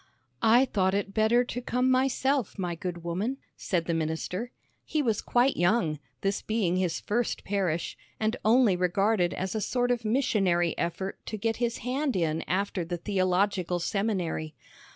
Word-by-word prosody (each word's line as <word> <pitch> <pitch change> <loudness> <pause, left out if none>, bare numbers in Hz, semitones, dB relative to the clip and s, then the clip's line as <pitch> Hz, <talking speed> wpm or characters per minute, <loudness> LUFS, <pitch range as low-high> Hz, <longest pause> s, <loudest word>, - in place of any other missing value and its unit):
"I 240 +4 +6
thought 190 -5 +1
it 200 0 -2
better 220 +3 +4
to 245 0 -5
come 250 +1 +1
myself, 265 -1 +1
my 180 -3 -2
good 175 0 -5
woman," 195 +10 -2 0.2
said 175 -4 -1
the 170 - -1
minister. 165 +7 -2 0.3
He 310 - -2
was 225 -5 +1
quite 250 +3 +2
young, 175 -4 +2 0.2
this 195 0 0
being 205 -5 0
his 185 -3 0
first 235 +3 -1
parish, 185 -5 -1 0.2
and 220 +2 +1
only 225 -2 +5
regarded 180 +1 +2
as 185 0 -3
a 220 - -1
sort 245 +3 0
of 240 -1 0
missionary 195 -8 +2
effort 190 +3 -3
to 215 - -3
get 225 +2 -1
his 235 -1 -1
hand 265 0 0
in 165 -3 0
after 195 0 -1
the 175 +1 -4
theological 185 -1 +1
seminary. 175 -5 -2
200 Hz, 160 wpm, -28 LUFS, 175-235 Hz, 0.3 s, I